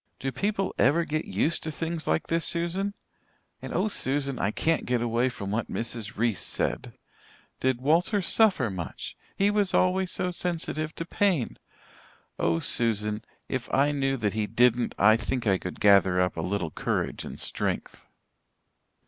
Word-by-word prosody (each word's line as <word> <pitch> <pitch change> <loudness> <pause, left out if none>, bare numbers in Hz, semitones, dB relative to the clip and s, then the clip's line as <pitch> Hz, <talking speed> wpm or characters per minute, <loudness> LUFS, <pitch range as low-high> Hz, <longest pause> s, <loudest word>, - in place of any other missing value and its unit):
Do 135 - -3
people 195 - -1
ever 165 +5 +4
get 155 +1 -2
used 160 - 0
to 160 - -4
things 165 +1 -4
like - - +1
this, 165 0 0
Susan? 180 +4 -1 0.7
And - - -7
oh, - - +1
Susan, 140 -8 0
I 100 - +1
can't 160 +9 0
get 125 -1 +1
away 120 +2 +1
from 100 -5 -6
what 110 +2 -2
Mrs. 115 -2 -4
Reese 115 -3 +1
said. - - -2 0.6
Did 130 -1 0
Walter 170 - +2
suffer 185 - +3
much 85 -7 -6 0.2
he 200 +1 +3
was 205 -2 +1
always 185 0 +2
so 180 - -1
sensitive 165 -3 -2
to 165 - -4
pain. 180 - 0 0.8
Oh, 85 -1 +2
Susan, 105 +2 0 0.2
if 130 -3 -4
I 140 +2 +3
knew 135 -1 0
that 105 -4 -1
he 110 -1 -1
didn't 120 +2 +2
I 110 +2 +6
think 120 +1 -3
I 95 -3 +3
could 90 - -6
gather 100 -3 +5
up 90 0 +1
a - - -3
little 90 -4 -2
courage - - -2
and - - -8
strength." - - -3
130 Hz, 165 wpm, -27 LUFS, 110-170 Hz, 0.8 s, I